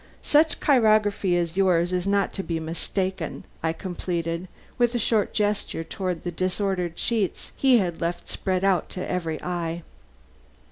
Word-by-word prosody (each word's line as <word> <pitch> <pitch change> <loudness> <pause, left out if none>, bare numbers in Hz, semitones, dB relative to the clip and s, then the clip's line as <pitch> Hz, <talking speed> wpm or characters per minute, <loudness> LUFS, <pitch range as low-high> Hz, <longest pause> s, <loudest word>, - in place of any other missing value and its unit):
"Such 305 +1 +4
chirography 215 -8 +3
as 170 -1 -1
yours 180 -2 +3
is 180 +1 0
not 200 0 +2
to 195 - -3
be 165 -3 -2
mistaken," 170 +2 -3 0.2
I 160 - +1
completed, 170 -1 -3 0.3
with 240 0 +3
a - - +3
short 220 -2 +1
gesture 205 -5 -1
toward 180 0 -3
the 175 - -2
disordered 185 -1 -1
sheets 220 -5 -1
he 265 -2 +5
had 175 -6 -1
left 175 +1 -2
spread 185 -1 -1
out 190 -4 +2
to 180 - -5
every 165 -4 -2
eye. 170 -1 -3
185 Hz, 150 wpm, -25 LUFS, 170-205 Hz, 0.3 s, he